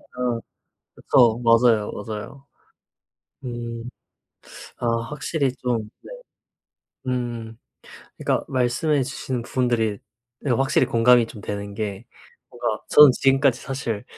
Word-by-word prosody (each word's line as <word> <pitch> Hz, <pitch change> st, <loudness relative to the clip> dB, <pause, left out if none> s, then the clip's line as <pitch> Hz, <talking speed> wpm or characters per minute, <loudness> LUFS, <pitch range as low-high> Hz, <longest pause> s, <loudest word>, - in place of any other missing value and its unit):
아 125 Hz, -2 st, -1 dB, 0.6 s
그쵸. 120 Hz, -2 st, +3 dB
맞아요, 115 Hz, -2 st, +4 dB
맞아요. 110 Hz, +6 st, -7 dB, 1.0 s
음. 120 Hz, -1 st, -6 dB, 0.9 s
아 120 Hz, -, -3 dB, 0.2 s
확실히 145 Hz, -2 st, -1 dB
좀 115 Hz, -4 st, -2 dB
네. -, -, -11 dB, 1.0 s
음. 120 Hz, -3 st, -3 dB, 0.6 s
그니까 -, -, -1 dB
말씀해 130 Hz, +3 st, +1 dB
주신 130 Hz, -2 st, -4 dB
분들이 120 Hz, -4 st, 0 dB, 0.4 s
네 140 Hz, -, -3 dB
확실히 135 Hz, +1 st, +2 dB
공감이 120 Hz, -1 st, +4 dB
좀 110 Hz, -, -11 dB
되는 100 Hz, 0 st, -5 dB
게 105 Hz, +1 st, -5 dB, 0.4 s
뭔가 120 Hz, -3 st, -3 dB
저는 150 Hz, -2 st, +9 dB
지금까지 135 Hz, -1 st, +2 dB
사실 120 Hz, -6 st, -4 dB
120 Hz, 205 characters per minute, -23 LUFS, 115-130 Hz, 1.0 s, 저는